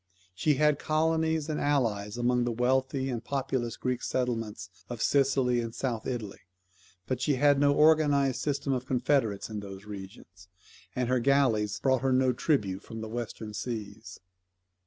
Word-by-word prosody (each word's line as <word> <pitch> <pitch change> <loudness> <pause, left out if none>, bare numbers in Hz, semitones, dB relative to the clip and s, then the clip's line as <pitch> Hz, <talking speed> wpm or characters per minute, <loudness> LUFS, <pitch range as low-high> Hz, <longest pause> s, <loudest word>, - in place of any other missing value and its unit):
She 150 - +1
had 150 0 +3
colonies 160 0 +1
and 155 -2 -2
allies 115 -7 0
among 120 0 +2
the 120 - -1
wealthy 130 +3 0
and 120 -3 -3
populous 130 -3 -2
Greek 125 -1 -2
settlements 115 -6 -3 0.2
in 120 - -4
Sicily 130 -1 +2
and 115 -1 -6
South 120 -5 -3
Italy, 110 -6 -4 0.7
but 130 +4 -3
she 145 - +2
had 145 +1 +4
no 145 0 +4
organized 145 -4 +4
system 140 -1 -1
of 130 0 -3
confederates 125 -5 +1
in 110 -2 -5
those 100 0 -9
regions; 95 -2 -11 0.5
and 125 -1 0
her 130 0 +2
galleys 115 -6 +2
brought 130 -2 +2
her 135 0 +1
no 130 0 +3
tribute 105 - 0
from 115 0 -8
the 110 - -6
western 110 -2 -5
seas. 110 -2 -6
125 Hz, 155 wpm, -29 LUFS, 110-140 Hz, 0.7 s, had